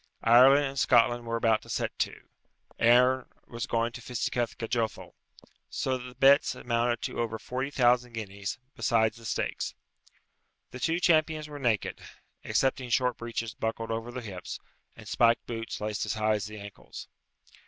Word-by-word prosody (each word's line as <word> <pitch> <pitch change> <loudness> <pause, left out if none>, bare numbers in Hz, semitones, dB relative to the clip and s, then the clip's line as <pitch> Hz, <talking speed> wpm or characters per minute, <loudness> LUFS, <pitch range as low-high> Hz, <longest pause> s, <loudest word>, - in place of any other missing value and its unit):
Ireland 130 +5 +7
and 135 0 -3
Scotland 120 -1 +3
were 115 - -1
about 115 -1 +2
to - - -16
set - - -2
to; - - -2 0.6
Erin 125 +2 +5 0.2
was 115 -1 -5
going 115 0 0
to 125 - -9
fisticuff 120 0 -2
Gajothel. 115 -1 -2 0.6
So 130 - -1
that - - -9
the 125 0 -10
bets 140 +1 +5
amounted 120 0 -1
to - - -4
over 115 -1 -1
forty 130 +4 -4
thousand 125 -3 +2
guineas, 100 -3 -5 0.2
besides 115 -2 +1
the 115 - -13
stakes. 95 - -2 1.0
The 125 - -8
two 165 +5 0
champions 155 -3 +2
were 145 -1 -8
naked, 115 -7 -1 0.4
excepting 130 -1 0
short 125 0 +1
breeches 115 -1 -4
buckled 115 0 -3
over 115 +1 -3
the 125 - -5
hips, 95 -6 -7 0.4
and - - -13
spiked 115 -1 +3
boots 115 -1 -5
laced 105 -1 -2
as 105 - -1
high 110 0 +2
as 105 0 -2
the 105 0 -9
ankles. 100 0 -10
120 Hz, 165 wpm, -28 LUFS, 115-125 Hz, 1.0 s, Ireland